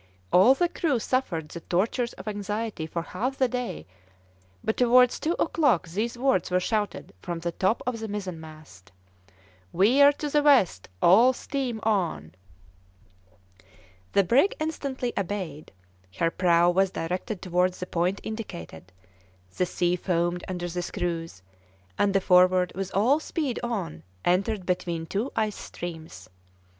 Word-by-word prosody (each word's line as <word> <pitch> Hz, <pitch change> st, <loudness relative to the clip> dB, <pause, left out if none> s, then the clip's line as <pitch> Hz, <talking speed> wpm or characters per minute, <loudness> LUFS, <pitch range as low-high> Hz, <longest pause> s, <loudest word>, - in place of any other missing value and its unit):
All 230 Hz, +9 st, +7 dB
the 350 Hz, +4 st, +2 dB
crew 315 Hz, -6 st, 0 dB
suffered 205 Hz, -11 st, -2 dB
the 170 Hz, -, -7 dB
tortures 225 Hz, +8 st, -1 dB
of -, -, -12 dB
anxiety 205 Hz, -3 st, -3 dB
for 170 Hz, +1 st, -4 dB
half 250 Hz, +11 st, -3 dB
the 260 Hz, -, +3 dB
day, 250 Hz, 0 st, -4 dB, 0.8 s
but 220 Hz, -, 0 dB
towards 250 Hz, 0 st, +4 dB
two 325 Hz, -, 0 dB
o'clock 295 Hz, -, +1 dB
these 220 Hz, +7 st, -2 dB
words 255 Hz, -8 st, +1 dB
were 180 Hz, 0 st, +2 dB
shouted 205 Hz, -, -2 dB
from 175 Hz, -1 st, -4 dB
the 170 Hz, +1 st, -3 dB
top 190 Hz, +6 st, 0 dB
of 245 Hz, -2 st, -2 dB
the 220 Hz, -, -5 dB
mizenmast: 160 Hz, -, -8 dB, 0.8 s
"Veer 260 Hz, +10 st, +5 dB
to 295 Hz, -, -5 dB
the 295 Hz, +1 st, +2 dB
west, 260 Hz, -, +3 dB
all 230 Hz, +9 st, +6 dB
steam 255 Hz, -3 st, -3 dB
on." 170 Hz, -, -1 dB, 1.8 s
The 200 Hz, -, +5 dB
brig 265 Hz, -, +3 dB
instantly 275 Hz, -5 st, -3 dB
obeyed; 180 Hz, -6 st, -4 dB, 0.5 s
her 165 Hz, -1 st, +1 dB
prow 175 Hz, -1 st, +3 dB
was 190 Hz, +2 st, +2 dB
directed 180 Hz, +4 st, -4 dB
towards 180 Hz, 0 st, 0 dB
the 180 Hz, -, -3 dB
point 180 Hz, +2 st, -1 dB
indicated; 90 Hz, -, -7 dB, 0.6 s
the 180 Hz, -, 0 dB
sea 175 Hz, 0 st, 0 dB
foamed 175 Hz, -1 st, -1 dB
under 180 Hz, -1 st, -4 dB
the 175 Hz, +1 st, -3 dB
screws, 165 Hz, -, -4 dB, 0.5 s
and 200 Hz, -, +1 dB
the 195 Hz, -, +4 dB
Forward, 180 Hz, 0 st, +4 dB
with 195 Hz, 0 st, -4 dB
all 245 Hz, +10 st, +4 dB
speed 305 Hz, -5 st, -3 dB
on, 210 Hz, -10 st, -4 dB, 0.2 s
entered 190 Hz, +2 st, +1 dB
between 170 Hz, -2 st, -2 dB
two 210 Hz, +10 st, -2 dB
ice 215 Hz, -2 st, -1 dB
streams. 160 Hz, -, -8 dB
190 Hz, 140 wpm, -26 LUFS, 175-240 Hz, 1.8 s, All